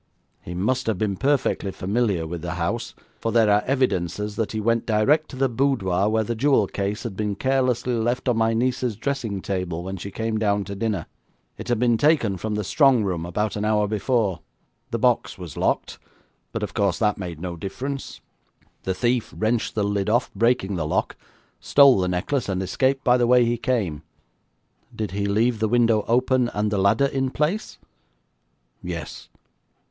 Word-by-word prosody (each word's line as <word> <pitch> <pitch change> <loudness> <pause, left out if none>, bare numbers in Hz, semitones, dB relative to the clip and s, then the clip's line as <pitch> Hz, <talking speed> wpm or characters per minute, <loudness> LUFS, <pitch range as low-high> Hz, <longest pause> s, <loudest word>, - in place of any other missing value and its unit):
He 90 - -7
must 125 +8 0
have 110 -4 0
been 100 -1 -1
perfectly 135 -4 0
familiar 100 -3 -1
with 85 +1 -5
the 90 +1 -4
house, 115 +8 -3 0.2
for 115 - -2
there 110 -3 +4
are 105 +1 +4
evidences 105 - 0
that 110 0 -2
he 110 - -3
went 115 +2 0
direct 120 +8 +2
to - - -9
the 135 +1 +2
boudoir 115 -7 +1
where 110 0 +1
the 115 - -2
jewel 125 -2 +3
case 100 +2 -3
had 115 -5 -5
been 105 0 -2
carelessly 125 -1 0
left 120 +3 -1
on 125 - +3
my 115 0 +2
niece's 125 -1 0
dressing 115 -5 -3
table 90 -3 -3
when 95 +1 -5
she 100 - -6
came 110 +1 -2
down 105 -1 +1
to 100 +1 -7
dinner. 100 -4 -2 0.5
It - - -7
had 120 -2 +1
been 120 -1 +2
taken 140 -11 +3
from 105 +4 -3
the 105 - -1
strong 135 +1 +4
room 85 -4 -2
about 105 +4 -2
an 105 - -2
hour 105 -1 +2
before. 105 -3 0 0.5
The - - -2
box - - +1
was 90 -6 -8
locked, - - -1 0.5
but, 115 - -3
of 100 -1 -4
course, 100 -5 +1
that 105 -2 +1
made 85 -4 -6
no 90 0 -5
difference. 130 +10 -6 0.6
The 95 - -1
thief 120 +2 0
wrenched 110 +1 0
the 105 - +1
lid 100 0 0
off, 120 +3 +1
breaking 100 -3 +1
the 75 -2 -2
lock, - - -1 0.4
stole 140 -6 +6
the 90 - +1
necklace, 95 +7 -1
and 95 -1 -1
escaped 130 +8 0
by 125 0 +4
the 120 -1 +2
way 125 0 +5
he 120 +1 +1
came.' 110 - -1 0.9
'Did 105 -3 -3
he 100 +1 -2
leave 110 +3 +1
the 110 -1 +1
window 115 -2 +3
open, 125 +1 +2
and 105 0 0
the 105 - 0
ladder 100 +8 +3
in 135 -1 -1
place?' 155 +10 -2 1.0
'Yes.' 85 -4 -7
110 Hz, 185 wpm, -23 LUFS, 100-125 Hz, 1.0 s, stole